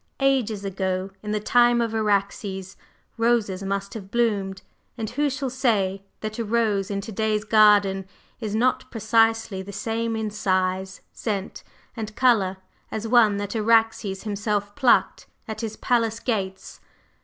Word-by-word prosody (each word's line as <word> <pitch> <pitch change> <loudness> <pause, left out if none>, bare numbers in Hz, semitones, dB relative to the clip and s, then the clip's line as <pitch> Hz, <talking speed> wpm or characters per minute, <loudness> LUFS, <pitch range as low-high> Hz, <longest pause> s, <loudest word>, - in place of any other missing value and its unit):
Ages 250 -7 +1
ago, 190 0 -2
in 210 - -7
the 210 - 0
time 240 +2 +4
of 230 -1 0
Araxes, 200 -2 -1 0.4
roses 230 -5 +1
must 195 0 -3
have 195 -4 -8
bloomed; 200 -5 0 0.3
and 220 -2 -4
who 290 +4 +1
shall 270 -1 -3
say 205 -7 +1 0.2
that 215 +1 -5
a - - 0
rose 215 -3 0
in 200 -1 -2
to 210 - -8
day's 215 0 0
garden 205 -3 +4 0.3
is 215 -3 -3
not 250 +3 +1
precisely 225 -3 +1
the 195 +1 -8
same 225 +3 -2
in 220 -1 -2
size, 185 -2 -1
scent 200 -3 -4 0.3
and 220 -2 -6
color 215 -8 +3 0.3
as 220 +1 -4
one 220 -3 +5
that 205 +2 -4
Araxes 225 -3 +2
himself 205 -1 -2
plucked 260 -4 +2 0.2
at 220 0 -5
his 220 -2 -5
palace 230 -2 +1
gates? 195 -6 -3
215 Hz, 145 wpm, -24 LUFS, 195-230 Hz, 0.4 s, one